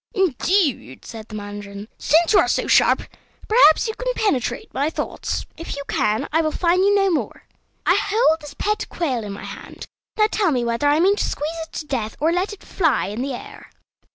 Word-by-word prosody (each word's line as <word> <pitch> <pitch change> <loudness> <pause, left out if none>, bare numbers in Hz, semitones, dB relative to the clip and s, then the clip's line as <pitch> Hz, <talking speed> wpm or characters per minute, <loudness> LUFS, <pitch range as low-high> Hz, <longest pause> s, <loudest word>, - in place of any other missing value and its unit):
"Indeed," 345 - 0
said 225 -2 -9
the 215 - -9
mandarin, 205 0 -7
"since 330 +5 +3
you - - +7
are - - +3
so - - 0
sharp, - - +4 0.4
perhaps 430 -5 +5
you 445 - -2
can - - -2
penetrate 285 - -1
my 285 +3 0
thoughts. - - -4
If 330 - -6
you 280 - -5
can, 210 +1 0
I 325 - +4
will 310 - 0
fine 350 +3 +1
you 405 +1 +4
no 390 -1 +3
more. 325 - -3 0.4
I - - +5
hold 405 -6 +2
this 295 -1 -10
pet 425 +1 -2
quail 265 -10 -2
in 205 - -6
my 200 - -8
hand; - - -9 0.3
now 425 - +5
tell 405 -5 +2
me 250 -5 0
whether 235 +5 0
I 295 +2 +3
mean 390 +4 +4
to - - 0
squeeze 300 +3 -3
it - - -39
to 305 - -5
death, 235 -7 -3
or 315 +3 +2
to - - 0
let 370 +4 -1
it 415 - -11
fly 320 - 0
in 215 +4 -4
the 270 -1 -3
air." - - -11
310 Hz, 215 wpm, -21 LUFS, 240-385 Hz, 0.4 s, you